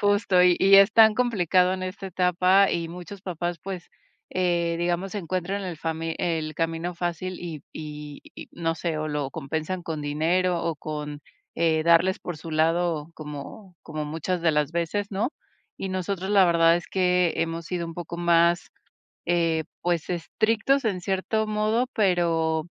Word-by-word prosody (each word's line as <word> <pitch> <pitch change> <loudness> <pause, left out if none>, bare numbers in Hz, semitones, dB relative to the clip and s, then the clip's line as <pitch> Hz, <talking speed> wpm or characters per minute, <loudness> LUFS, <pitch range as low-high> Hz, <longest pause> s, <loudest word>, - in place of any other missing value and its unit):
Justo, 205 -2 +3
y 180 -1 +6
y 195 0 +7
es 200 +2 +7
tan 220 -1 +7
complicado 185 -7 +2
en 185 - -5
esta 185 +1 -6
etapa 185 +2 +3
y 165 -1 -2
muchos 180 +3 -9
papás, 175 -2 -3
pues, 185 -2 -7 0.4
eh, 170 -2 0
digamos, 175 +3 -1
encuentran 185 +1 -2
el 175 -3 -5
fami 165 0 -3
el 160 -3 -1
camino 165 +2 -2
fácil, 175 +1 -3
y 165 -4 -6
y 150 -2 -8
y - - -10
no 165 -1 -1
sé, 165 -1 -3
o 155 - -2
lo 145 -2 -2
compensan 160 +5 -4
con 160 -2 -4
dinero, 170 +5 +1
o, 165 - -1
con, 150 -1 -6 0.3
eh, 160 -1 +2
darles 170 +3 +4
por 175 - -6
su 160 +2 -9
lado 165 0 +1
como 155 +6 -9
como 155 -1 -5
muchas 165 +3 -3
de 165 - +4
las 150 0 0
veces, 170 +5 -2
¿no? 205 +6 -1 0.5
Y 195 - -3
nosotros 185 +1 -3
la 200 -2 +6
verdad 170 0 +5
es 175 - -6
que 180 -2 +2
hemos 165 0 -2
sido 175 -1 -3
un 165 - -8
poco 175 0 -6
más, 170 0 +3 0.6
eh, 165 -2 +1 0.2
pues 175 -3 0
estrictos 220 +9 +1
en 195 -4 -1
cierto 195 +4 -1
modo, 215 +3 +1
pero 165 -5 +1
175 Hz, 165 wpm, -25 LUFS, 165-185 Hz, 0.6 s, y